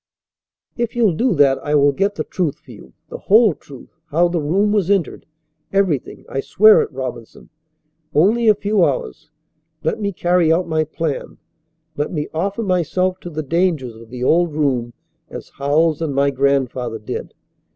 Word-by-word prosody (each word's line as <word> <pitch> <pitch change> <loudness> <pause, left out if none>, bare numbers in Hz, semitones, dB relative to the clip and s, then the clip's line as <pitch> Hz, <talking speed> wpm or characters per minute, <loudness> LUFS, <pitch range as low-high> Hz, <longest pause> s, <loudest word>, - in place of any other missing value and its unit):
"If 235 -1 -2
you'll 225 -6 +3
do 230 +5 +1
that, 140 -2 +3
I 150 0 -1
will 145 0 +4
get 200 +8 -1
the - - -3
truth 170 -7 -2
for - - -17
you - - -14 0.2
the - - -7
whole 215 -1 +4
truth, 140 -2 -14 0.2
how 170 +4 +2
the 170 -2 -1
room 195 +8 +1
was 200 -4 +1
entered, 195 -5 -1 0.4
everything. 190 -9 -1
I 135 - -4
swear 215 +9 +5
it, - - -4
Robinson. 125 -4 -7 0.7
Only 220 +9 +3
a 215 - +6
few 205 -1 +1
hours. 125 - -2 0.5
Let - - -1
me 200 -1 -1
carry 175 -2 +2
out 175 +2 +1
my 160 -1 0
plan. 155 -2 -4 0.6
Let 145 - -2
me 150 -3 -3
offer 195 +7 -2
myself 185 0 0
to 175 - -8
the 155 -1 -4
dangers 160 -6 -1
of 115 0 -14
the 125 +1 -6
old 165 +2 +2
room 130 -6 -1 0.4
as - - -9
Howells 155 +3 +1
and 150 -4 -2
my 140 0 +2
grandfather 130 -3 0
did. 105 - -7
160 Hz, 170 wpm, -19 LUFS, 140-190 Hz, 0.7 s, a